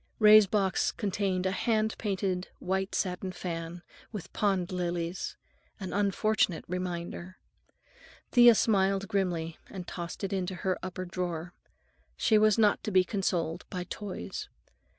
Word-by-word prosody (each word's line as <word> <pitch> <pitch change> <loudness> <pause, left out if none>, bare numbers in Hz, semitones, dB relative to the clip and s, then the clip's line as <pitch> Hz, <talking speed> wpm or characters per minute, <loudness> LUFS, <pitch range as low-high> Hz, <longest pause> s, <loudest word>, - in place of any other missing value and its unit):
Ray's 215 -1 +8
box 195 -1 +1
contained 195 -3 -1
a 190 - +2
hand 220 +1 +1
painted 190 -3 -1
white 190 +1 -2
satin 185 0 -1
fan, 170 -1 -5 0.3
with 195 -6 -7
pond 195 -3 +1
lilies—an 175 +2 -5
unfortunate 205 -2 +1
reminder. 180 0 -4 0.9
Thea 240 -2 +8
smiled 195 -2 +2
grimly 175 -5 -1
and 185 -3 -7
tossed 170 +2 -6
it 195 - -2
into 185 -1 -2
her 185 +1 -1
upper 185 0 -5
drawer. 175 -1 -4 0.6
She 215 -2 +4
was 215 -1 +4
not 210 -2 +3
to - - 0
be 185 -2 +5
consoled 180 -4 -1
by 180 -1 -3
toys. 180 - -6
185 Hz, 130 wpm, -30 LUFS, 175-200 Hz, 0.9 s, Ray's